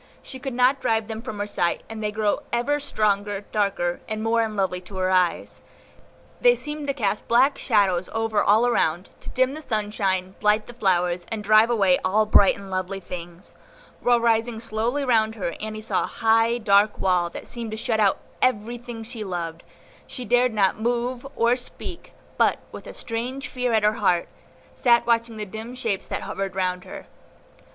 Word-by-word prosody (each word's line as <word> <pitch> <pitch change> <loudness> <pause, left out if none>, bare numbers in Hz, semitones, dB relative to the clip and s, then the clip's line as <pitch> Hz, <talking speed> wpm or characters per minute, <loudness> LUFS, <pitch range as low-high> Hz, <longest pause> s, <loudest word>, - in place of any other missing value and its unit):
She 260 - -7
could 265 -2 -5
not 255 +2 +3
drive 220 -1 +1
them 220 0 -5
from 235 -3 -6
her 205 - -2
sight, 175 -4 -1
and 225 -1 -7
they 210 -1 -1
grew 210 -1 0
ever 290 +5 +1
stronger, 205 -6 0
darker, 195 -4 0
and 215 0 -3
more 230 +1 +2
unlovely 195 -5 -1
to 190 +1 -10
her 185 0 +1
eyes. 180 -2 0 0.8
They - - +6
seemed 295 -4 -4
to 275 - +1
cast 210 -5 -1
black 260 +5 +4
shadows 195 -6 +2
over 225 -1 0
all 215 +4 +4
around, 180 -7 0
to - - -9
dim 260 +1 +1
the 310 - -7
sunshine, 205 -6 -1
blight 210 +1 +2
the 240 - -11
flowers, 180 -5 0
and 220 -2 -3
drive 215 +2 +5
away 195 -6 +3
all 210 +4 +2
bright 205 -2 +5
and 195 -1 -10
lovely 185 +1 -3
things; 175 -1 -9 0.5
while 240 -1 +3
rising 230 0 +1
slowly 230 +5 -1
round 220 -3 +2
her 185 -6 -3
Annie 215 0 -5
saw 220 - 0
a - - -6
high, 225 +1 +2
dark 210 -2 +3
wall, 180 -2 +1
that - - -9
seemed 235 -2 -4
to 220 - -5
shut 220 0 -1
out 200 -2 +3 0.2
everything 240 -1 -1
she 225 -1 -5
loved; 170 -3 -4 0.5
she 250 - -6
dared 245 +1 +3
not 200 -2 +1
move, 240 +3 -1
or 235 +1 +3
speak, 300 +7 -8 0.3
but, - - +4
with - - -10
a - - -8
strange 250 +4 -4
fear 250 -1 -2
at 220 -2 +2
her 210 +1 +4
heart, 180 -6 +1 0.5
sat 235 -2 +3
watching 230 -1 +1
the 210 - -4
dim 220 +5 -7
shapes 225 -6 -2
that - - -4
hovered 195 -1 -4
round 180 -1 -1
her. - - -9
220 Hz, 185 wpm, -24 LUFS, 195-240 Hz, 0.8 s, They